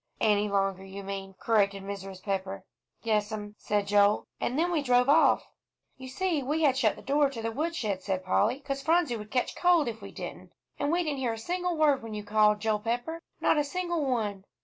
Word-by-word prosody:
"Any 210 -1 +2
longer, 195 -1 0
you 195 +1 -8
mean," 195 0 -6
corrected 200 -3 +1
Mrs. 195 -1 -7
Pepper. 195 -1 -3 0.4
"Yes'm," 210 -1 -1
said 205 -1 0
Joel; 205 +1 +3
"and 255 - -1
then 345 +3 +1
we 325 -4 +1
drove 250 -2 +3
off." 315 +3 +5 0.5
"You 260 0 -10
see, 335 +2 -1
we 300 +5 -1
had 280 -3 +5
to 260 - -2
shut 215 -4 +3
the - - -13
door 285 +1 +2
to 260 -4 -7
the 225 0 -2
woodshed," 240 - -2
said 190 -1 -3
Polly, 225 +8 +1
"'cause 275 -1 -4
Phronsie 320 -4 +2
would 210 -1 -9
catch 250 +2 -1
cold 350 -5 +3
if 225 -2 -5
we 200 - -8
didn't, - - -8 0.3
and 285 - 0
we 350 +1 +2
didn't 295 -4 -2
hear 245 -3 0
a - - -6
single 355 +7 -2
word 295 -3 +3
when 225 -1 -7
you 210 - -5
called, 210 0 +3
Joel 215 -1 +1
Pepper; 245 +10 -3 0.2
not 300 - +3
a - - +2
single 345 +1 -2
one!" 215 -7 -1
225 Hz, 215 wpm, -28 LUFS, 205-290 Hz, 0.5 s, off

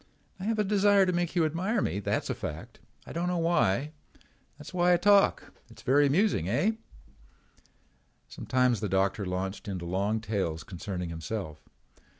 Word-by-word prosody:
I 190 - -5
have 225 +1 0
a 210 - +2
desire 200 -1 +4
to 180 - 0
make 175 0 -1
you 170 -2 +3
admire 180 +9 -1
me, 90 +6 -1
that's 105 - -1
a - - 0
fact. 80 +1 -7 0.3
I - - -9
don't 170 +2 -1
know 180 0 0
why. 155 - +1 0.7
That's - - -11
why 180 0 +3
I - - +5
talk. 200 +2 +3 0.2
It's 110 0 -15
very 140 +2 +4
amusing, 195 +10 +1
eh?" 210 +4 +2 1.6
Sometimes 125 -3 0
the 105 - -3
doctor 95 +1 0
launched 95 +4 -4
into 90 -3 -4
long 100 +5 0
tales 95 -7 -2
concerning 90 0 -5
himself. 80 -1 -5
125 Hz, 160 wpm, -28 LUFS, -, 1.6 s, I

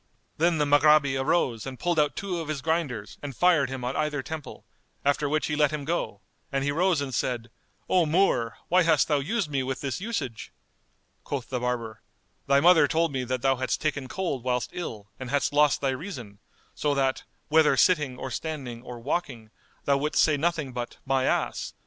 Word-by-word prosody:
Then 170 0 +3
the 150 - +2
Maghrabi 145 -1 +5
arose 135 -4 0
and 130 -1 -7
pulled 175 -2 +1
out 150 -1 +2
two 185 -3 -3
of 165 - -5
his 150 -3 -4
grinders 140 -11 -2
and 140 -4 -7
fired 175 -7 +4
him 130 -1 -5
on 125 +2 -2
either 150 -3 -1
temple; 160 0 -7 0.4
after 145 +1 +2
which 155 +1 +1
he 150 - -1
let 150 -1 +3
him 150 -2 -4
go, 115 -11 -2 0.3
and 135 0 0
he 145 - +1
rose 170 0 +2
and 135 -2 -4
said, 120 -1 -2 0.4
"O 180 -3 +3
Moor, 150 - +2
why 185 +2 +4
hast 160 -3 +3
thou 150 -2 +2
used 165 +3 -1
me 135 -2 0
with 130 0 -3
this 135 +2 -3
usage?" 195 - -4 0.7
Quoth 135 -5 -4
the 125 - -1
barber, 120 -3 -3 0.5
"Thy 140 0 +5
mother 170 +2 +6
told 165 -1 +1
me 130 -2 -2
that 130 0 -3
thou 135 -1 +3
hadst 130 0 -1
taken 145 -3 -2
cold 155 -7 -3
whilst 125 -1 -1
ill, 105 - -6
and 130 -2 -6
hadst 145 +1 0
lost 145 -1 +4
thy 135 - +1
reason, 130 - -7 0.3
so 145 -1 0
that, 135 -1 +1 0.3
whether 160 0 +4
sitting 150 -9 +3
or 130 - -5
standing 135 -6 -5
or 120 -1 -9
walking, 120 -5 -3 0.3
thou 140 -1 +3
wouldst 150 +2 +2
say 155 - +3
nothing 155 -3 -1
but 120 -1 -5
My 135 -1 +1
ass! - - -1
140 Hz, 200 wpm, -26 LUFS, 130-160 Hz, 0.7 s, mother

